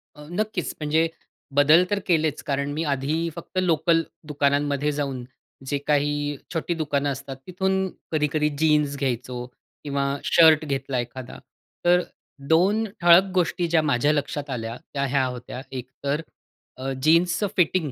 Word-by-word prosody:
अ, 150 Hz, -, -12 dB
नक्कीच 210 Hz, -2 st, -2 dB
म्हणजे 155 Hz, +2 st, +2 dB, 0.5 s
बदल 150 Hz, +5 st, +6 dB
तर 205 Hz, -, +1 dB
केलेच. 160 Hz, -4 st, +1 dB
कारण 140 Hz, 0 st, -2 dB
मी 160 Hz, -, -2 dB
आधी 155 Hz, +5 st, -1 dB
फक्त 175 Hz, +2 st, -9 dB
लोकल 165 Hz, -1 st, +2 dB, 0.2 s
दुकानांमध्ये 145 Hz, 0 st, +1 dB
जाऊन 140 Hz, -4 st, -3 dB, 0.4 s
जे 145 Hz, -, 0 dB
काही 145 Hz, 0 st, +1 dB, 0.2 s
छोटी 170 Hz, +1 st, -1 dB
दुकानं 145 Hz, -3 st, -1 dB
असतात, 135 Hz, 0 st, -6 dB
तिथून 190 Hz, +1 st, 0 dB, 0.2 s
कधी-कधी 150 Hz, -1 st, +1 dB
जीन्स 150 Hz, -2 st, +2 dB
घ्यायचो 125 Hz, -2 st, -3 dB, 0.4 s
किंवा 140 Hz, -1 st, -1 dB, 0.2 s
शर्ट 160 Hz, -2 st, +5 dB
घेतला 135 Hz, -2 st, -2 dB
एखादा. 125 Hz, +1 st, -6 dB, 0.5 s
तर 180 Hz, +1 st, +5 dB, 0.5 s
2 195 Hz, +8 st, +3 dB, 0.2 s
ठळक 175 Hz, +2 st, +8 dB
गोष्टी 175 Hz, -1 st, +1 dB
ज्या 165 Hz, -1 st, +3 dB
माझ्या 145 Hz, -1 st, +2 dB
लक्षात 145 Hz, 0 st, -3 dB
आल्या 115 Hz, -3 st, -4 dB, 0.2 s
त्या 140 Hz, -1 st, 0 dB
ह्या 135 Hz, -1 st, +2 dB
होत्या, 125 Hz, 0 st, -6 dB
एक 130 Hz, -1 st, -6 dB
तर 140 Hz, +2 st, 0 dB, 0.6 s
अ, 135 Hz, +1 st, -3 dB
जीन्सचं 170 Hz, +5 st, +3 dB
फिटिंग 170 Hz, -3 st, +2 dB
150 Hz, 140 wpm, -24 LUFS, 140-165 Hz, 0.6 s, ठळक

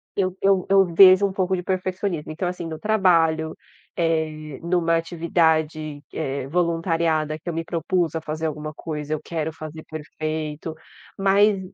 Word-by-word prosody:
eu 185 Hz, -2 st, 0 dB
eu 195 Hz, -2 st, +3 dB
eu 195 Hz, -1 st, +6 dB
vejo 185 Hz, +3 st, +7 dB
um 195 Hz, -, -2 dB
pouco 190 Hz, -1 st, 0 dB
de 180 Hz, -, -4 dB
perfeccionismo. 185 Hz, -3 st, -2 dB
Então, 175 Hz, +3 st, -3 dB
assim, 180 Hz, -1 st, -4 dB
no 160 Hz, -1 st, -6 dB
trabalho, 165 Hz, -7 st, +2 dB, 0.4 s
eh, 155 Hz, -3 st, -1 dB
numa 170 Hz, -1 st, +2 dB
atividade 160 Hz, -3 st, 0 dB
que -, -, -10 dB
eh 140 Hz, -3 st, -3 dB
voluntariada, 165 Hz, -2 st, 0 dB
que 175 Hz, -, -7 dB
eu -, -, -2 dB
me 165 Hz, +1 st, -2 dB
propus 170 Hz, -1 st, -1 dB
a 160 Hz, -, -2 dB
fazer 155 Hz, +1 st, -4 dB
alguma 155 Hz, -1 st, -4 dB
coisa, 150 Hz, -1 st, -5 dB
eu 155 Hz, -, -2 dB
quero 160 Hz, -1 st, -3 dB
fazer 155 Hz, 0 st, -9 dB
perfeito. 155 Hz, 0 st, -5 dB, 0.4 s
Mas 200 Hz, +1 st, +4 dB
165 Hz, 160 wpm, -23 LUFS, 155-180 Hz, 0.4 s, vejo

